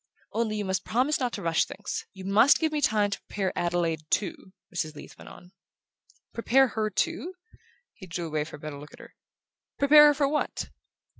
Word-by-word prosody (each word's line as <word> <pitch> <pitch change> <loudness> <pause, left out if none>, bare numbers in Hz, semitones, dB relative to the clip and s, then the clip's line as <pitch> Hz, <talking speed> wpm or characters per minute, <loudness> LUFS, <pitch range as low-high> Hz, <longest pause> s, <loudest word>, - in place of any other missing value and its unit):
"Only 220 -1 -1
you 210 -1 -3
must 190 0 -1
promise 260 +6 +1
not 250 -2 -1
to - - -5
rush 165 -1 +2
things. 210 - -6
You 190 -1 -11
must 210 +8 +5
give 320 -1 0
me 300 -1 -1
time 210 -5 +2
to - - -3
prepare 195 -2 -3
Adelaide 170 -2 -1
too," 190 -1 -2 0.2
Mrs. 155 -3 -3
Leath 145 - -11
went - - -13
on. 180 - -15 0.8
"Prepare 260 +3 +3
her 215 -1 -1
too?" 340 - -2 0.6
He 190 - -12
drew 170 0 -4
away 155 -2 -1
for 155 - -10
a - - -13
better 150 -1 -7
look 150 +1 -12
at - - -13
her. - - -14 0.6
"Prepare 295 +1 +8
her 295 - +5
for 280 -1 +2
what?" 300 +2 -2
205 Hz, 200 wpm, -27 LUFS, 175-270 Hz, 0.8 s, Prepare